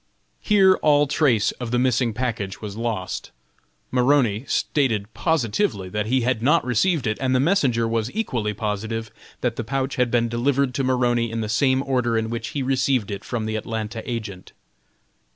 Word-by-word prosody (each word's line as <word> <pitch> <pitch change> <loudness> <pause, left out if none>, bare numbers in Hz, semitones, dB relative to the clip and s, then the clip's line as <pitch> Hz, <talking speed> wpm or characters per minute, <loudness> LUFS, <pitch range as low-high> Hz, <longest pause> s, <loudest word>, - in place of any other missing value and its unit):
Here 195 -3 +4
all 145 -1 +4
trace 135 -7 +2
of 120 - -3
the 120 - +1
missing 125 -1 +2
package 110 -4 -3
was 105 -2 -7
lost. 110 -5 -3 0.6
Maroney 125 -3 +2
stated 110 -8 0
positively 120 - 0
that 105 +2 -2
he 130 +2 +2
had 120 -1 0
not 150 +6 +3
received 135 - +1
it, 110 -1 -1
and 130 -1 +1
the - - +3
messenger 130 -8 +2
was 115 0 -1
equally 115 - -1
positive 110 +1 -3 0.3
that 120 -2 -1
the - - -2
pouch 135 +3 -2
had 125 -1 +2
been 120 0 +2
delivered 130 +3 0
to 135 - -1
Maroney 120 -2 +1
in 115 0 -3
the 110 - -2
same 130 +4 +2
order 125 -4 0
in 110 0 -2
which 115 -1 -3
he 140 - -3
received 130 -4 +1
it 100 -1 -5
from 115 -3 -3
the 110 0 -2
Atlanta 110 +1 -4
agent. 105 -6 -6
120 Hz, 175 wpm, -23 LUFS, 110-135 Hz, 0.6 s, Here